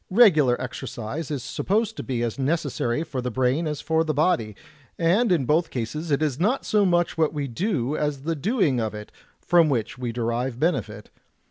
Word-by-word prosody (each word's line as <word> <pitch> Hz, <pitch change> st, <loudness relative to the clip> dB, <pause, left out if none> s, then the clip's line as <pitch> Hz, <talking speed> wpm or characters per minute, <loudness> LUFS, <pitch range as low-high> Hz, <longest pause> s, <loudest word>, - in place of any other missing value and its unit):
Regular 155 Hz, -, +5 dB
exercise 130 Hz, +3 st, -5 dB
is 140 Hz, -5 st, -3 dB
supposed 220 Hz, +2 st, -1 dB
to -, -, -5 dB
be 120 Hz, -3 st, -2 dB
as 120 Hz, +3 st, -3 dB
necessary 140 Hz, -2 st, -1 dB
for 135 Hz, -5 st, -4 dB
the 125 Hz, -, -2 dB
brain 130 Hz, +6 st, 0 dB
as 150 Hz, -1 st, -3 dB
for 160 Hz, 0 st, +1 dB
the 155 Hz, -2 st, -2 dB
body, 130 Hz, -, +1 dB, 0.4 s
and 185 Hz, +7 st, +2 dB
in 160 Hz, -7 st, +2 dB
both 160 Hz, +5 st, +2 dB
cases 145 Hz, +7 st, -4 dB
it 145 Hz, +1 st, +1 dB
is 145 Hz, -4 st, -1 dB
not 220 Hz, +10 st, +1 dB
so 210 Hz, -2 st, +3 dB
much 175 Hz, -2 st, +1 dB
what 160 Hz, -1 st, +2 dB
we 145 Hz, -2 st, -2 dB
do 145 Hz, -, -1 dB
as 150 Hz, -3 st, -2 dB
the 165 Hz, +2 st, -1 dB
doing 160 Hz, -, +1 dB
of 110 Hz, -2 st, -2 dB
it, 105 Hz, 0 st, -9 dB, 0.3 s
from 170 Hz, -3 st, +4 dB
which 120 Hz, -3 st, -2 dB
we 120 Hz, -2 st, -2 dB
derive 120 Hz, +1 st, -2 dB
benefit. 155 Hz, -, -2 dB
150 Hz, 195 wpm, -24 LUFS, 125-170 Hz, 0.4 s, Regular